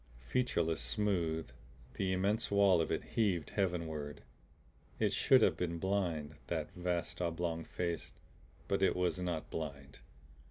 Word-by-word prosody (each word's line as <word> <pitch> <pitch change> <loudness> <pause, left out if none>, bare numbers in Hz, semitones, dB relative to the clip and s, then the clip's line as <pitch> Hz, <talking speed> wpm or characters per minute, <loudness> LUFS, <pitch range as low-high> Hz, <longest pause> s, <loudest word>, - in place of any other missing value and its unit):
Featureless, 85 - +1
smooth, 80 +1 0 0.4
the 95 -1 -1
immense 100 +5 +1
wall 100 -4 +5
of - - -1
it - - 0
heaved 95 -9 0
heavenward. 80 -6 -2 0.7
It - - +2
should - - +5
have - - +4
been 85 -1 -2
blind, 85 -5 -1
that 80 -3 -2
vast 90 -1 -2
oblong 85 -1 -1
face 85 0 -3 0.6
but 100 - +1
it 95 - +4
was 90 0 +1
not 85 -3 -3
blind. 70 -3 -5
85 Hz, 130 wpm, -35 LUFS, 80-95 Hz, 0.7 s, wall